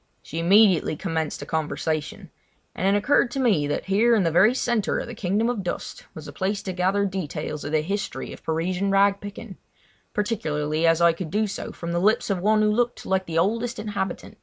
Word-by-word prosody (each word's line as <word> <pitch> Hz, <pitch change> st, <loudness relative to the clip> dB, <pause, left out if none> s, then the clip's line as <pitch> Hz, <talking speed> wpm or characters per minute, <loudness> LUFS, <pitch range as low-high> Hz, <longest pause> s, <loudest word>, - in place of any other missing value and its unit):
She 165 Hz, -, -5 dB
immediately 185 Hz, -2 st, +4 dB
commenced 160 Hz, -2 st, -3 dB
a -, -, -8 dB
conversation; 155 Hz, -1 st, -3 dB, 0.4 s
and 185 Hz, -, -1 dB
it 200 Hz, +1 st, +4 dB
occurred 245 Hz, +3 st, +3 dB
to 270 Hz, -, -4 dB
me 200 Hz, -, +2 dB
that 145 Hz, -, -2 dB
here 220 Hz, +5 st, +3 dB
in 210 Hz, -, +2 dB
the 165 Hz, -, +1 dB
very 205 Hz, +9 st, +5 dB
centre 235 Hz, -5 st, 0 dB
of -, -, -3 dB
the 240 Hz, -, -8 dB
Kingdom 210 Hz, +1 st, 0 dB
of 240 Hz, -4 st, -1 dB
Dust 180 Hz, -, -6 dB
was -, -, -9 dB
the -, -, -8 dB
place 200 Hz, +1 st, -2 dB
to 190 Hz, -, -4 dB
gather 190 Hz, +3 st, +1 dB
details 180 Hz, -5 st, -4 dB
of 145 Hz, -, -5 dB
the 155 Hz, -1 st, +2 dB
history 200 Hz, +5 st, -4 dB
of -, -, -13 dB
Parisian 180 Hz, +4 st, -1 dB
rag 195 Hz, 0 st, +3 dB
picking—particularly 190 Hz, -6 st, -4 dB
as 165 Hz, +1 st, +3 dB
I 170 Hz, -1 st, +5 dB
could 165 Hz, -1 st, -6 dB
do 215 Hz, +4 st, +1 dB
so 200 Hz, -, -5 dB
from 170 Hz, 0 st, -6 dB
the 175 Hz, -, 0 dB
lips 210 Hz, +2 st, +2 dB
of 190 Hz, -, 0 dB
one 215 Hz, +3 st, +3 dB
who 210 Hz, -, +3 dB
looked 240 Hz, +2 st, -1 dB
like 190 Hz, 0 st, 0 dB
the 165 Hz, -1 st, -3 dB
oldest 230 Hz, +7 st, 0 dB
inhabitant. 200 Hz, -3 st, -4 dB
195 Hz, 210 wpm, -24 LUFS, 165-210 Hz, 0.4 s, very